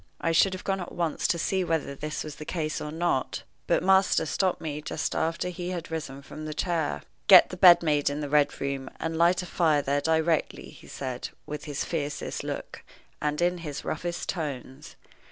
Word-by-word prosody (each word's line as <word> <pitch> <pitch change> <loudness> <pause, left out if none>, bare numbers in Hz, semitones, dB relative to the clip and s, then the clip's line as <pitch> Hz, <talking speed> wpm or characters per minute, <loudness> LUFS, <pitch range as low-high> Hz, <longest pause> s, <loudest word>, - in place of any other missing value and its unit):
I 165 - 0
should 185 +4 +4
have 185 - -6
gone 195 0 -1
at 175 - -7
once 165 -3 -1
to 170 - +1
see 190 +3 0
whether 160 -5 -1
this 150 +2 -4
was 150 -2 -8
the 150 - -7
case 155 -1 -3
or 150 - -5
not, 160 -5 -1 0.2
but - - +2
my 190 +1 +5
master 190 -4 +1
stopped 185 +4 0
me 150 -2 -4
just 155 +1 -3
after 165 +2 -1
he 180 0 -5
had 175 -3 -5
risen 140 -4 -5
from 155 +2 -8
the 155 -1 -5
chair. 170 -2 -1 0.2
"Get 185 -3 +9
the - - -4
bed 175 -2 +8
made 150 -3 +2
in 145 +1 -3
the 145 - -3
Red 145 0 +2
Room, 135 -1 -3
and 165 0 -2
light 175 +2 +3
a - - -6
fire 160 -5 +2
there 140 +1 +1
directly," 160 0 0
he - - -15
said, 130 -2 -5 0.2
with 150 0 -6
his 145 -2 -3
fiercest 145 -3 -3
look - - -6 0.4
and 150 +3 0
in 175 0 +1
his 150 -4 -6
roughest 175 +3 -3
tones. 135 -6 -5
160 Hz, 210 wpm, -27 LUFS, 145-175 Hz, 0.4 s, Get